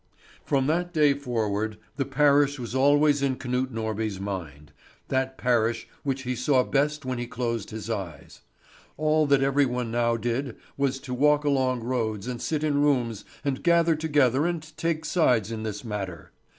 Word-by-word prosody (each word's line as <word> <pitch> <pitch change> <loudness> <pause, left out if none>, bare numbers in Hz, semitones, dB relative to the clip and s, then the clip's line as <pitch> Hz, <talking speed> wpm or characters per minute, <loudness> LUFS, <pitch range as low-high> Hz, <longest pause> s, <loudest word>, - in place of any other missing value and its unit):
From 135 -2 +1
that 175 +4 -1
day 150 -2 +5
forward 110 -6 -2 0.2
the 135 - -1
parish 145 0 +3
was 120 -3 -6
always 145 +2 +4
in 135 -2 +1
Knut 125 0 -1
Norby's 110 -3 -3
mind, 85 -8 -6 0.4
that 130 0 -1
parish 120 -2 +1
which 135 -1 -2
he 125 0 -2
saw 125 +1 +2
best 145 +1 0
when 130 -1 -2
he 120 - -4
closed 115 -4 -3
his 110 -1 -7
eyes. 100 -8 -6 0.6
All 155 0 +2
that 140 -1 +4
every 140 0 +3
one 125 -2 -3
now 120 0 +1
did 120 +2 -2 0.2
was 135 -1 0
to 130 -4 -6
walk 150 +3 +3
along 130 -4 +1
roads 115 -3 -2
and 125 -1 -4
sit 155 +4 -1
in 145 -2 +2
rooms 125 -7 +1 0.2
and 135 -2 -1
gather 170 -1 +4
together 145 -2 +2
and 160 -3 -5
take 165 -1 -1
sides 125 - +2
in 110 -1 -4
this 105 0 -5
matter. 95 -7 -5
130 Hz, 170 wpm, -26 LUFS, 115-145 Hz, 0.6 s, day